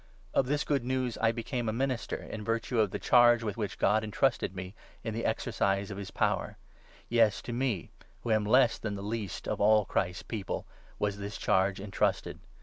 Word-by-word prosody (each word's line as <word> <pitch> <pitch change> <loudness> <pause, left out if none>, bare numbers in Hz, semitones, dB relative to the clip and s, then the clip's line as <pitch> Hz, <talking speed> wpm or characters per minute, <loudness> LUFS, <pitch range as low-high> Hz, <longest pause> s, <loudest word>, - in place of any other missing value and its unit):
Of 130 - +2
this 145 +2 +1
Good 140 -4 0
News 130 -1 -1
I 115 0 +3
became 120 0 -3
a - - +1
minister, 130 +1 -1
in 110 - -7
virtue 115 +1 -1
of 105 -2 +3
the - - -3
charge 120 -1 +5
with 105 -3 -2
which 105 -3 -3
God 110 +2 +3
entrusted 110 -2 0
me 95 0 -6 0.3
in 110 - -3
the 115 +1 -3
exercise 100 +1 0
of 100 - -5
his 100 - -6
power - - -1 0.3
— - - -26
yes, 115 -3 +3
to 120 - -5
me, 120 -7 -1 0.3
who 115 - -1
am 110 -1 +3
less 125 +1 +4
than 105 -2 -3
the 100 - -6
least 105 -3 -4
of - - -2
all 105 0 +5
Christ's 90 -2 -1
People, 105 -4 -4 0.3
was 100 -1 -1
this 100 +1 -5
charge 95 -1 +2
entrusted 100 0 -1
110 Hz, 200 wpm, -30 LUFS, 100-120 Hz, 0.3 s, charge